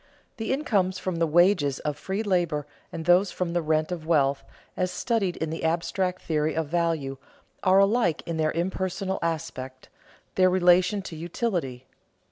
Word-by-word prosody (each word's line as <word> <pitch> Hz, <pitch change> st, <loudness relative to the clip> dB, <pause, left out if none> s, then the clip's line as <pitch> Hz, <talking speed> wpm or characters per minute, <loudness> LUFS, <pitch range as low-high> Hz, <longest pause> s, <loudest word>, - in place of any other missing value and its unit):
_ -, -, -43 dB
The 225 Hz, -1 st, -3 dB
incomes 200 Hz, -10 st, +1 dB
from 185 Hz, -2 st, -3 dB
the 165 Hz, 0 st, +2 dB
wages 165 Hz, -4 st, +3 dB
of 150 Hz, -1 st, -2 dB
free 190 Hz, +8 st, -3 dB
labor 175 Hz, -7 st, 0 dB, 0.3 s
and 160 Hz, -1 st, -6 dB
those 180 Hz, +3 st, +4 dB
from 175 Hz, -2 st, -3 dB
the 175 Hz, -, +1 dB
rent 155 Hz, +1 st, 0 dB
of 165 Hz, -3 st, -5 dB
wealth, 140 Hz, -4 st, +2 dB, 0.3 s
as 185 Hz, -1 st, 0 dB
studied 200 Hz, -3 st, -1 dB
in 160 Hz, -1 st, -3 dB
the 160 Hz, -, -5 dB
abstract 180 Hz, +3 st, -1 dB
theory 155 Hz, -1 st, 0 dB
of 160 Hz, -2 st, -2 dB
value, 165 Hz, -5 st, -1 dB, 0.4 s
are 190 Hz, 0 st, +4 dB
alike 195 Hz, -4 st, +3 dB
in 165 Hz, -1 st, -3 dB
their 155 Hz, -1 st, +1 dB
impersonal 190 Hz, +2 st, -2 dB
aspect, 130 Hz, -5 st, -4 dB, 0.4 s
their 185 Hz, -1 st, +4 dB
relation 185 Hz, +2 st, +3 dB
to 175 Hz, -, -7 dB
utility. 165 Hz, -, -3 dB
175 Hz, 165 wpm, -26 LUFS, 155-185 Hz, 0.4 s, those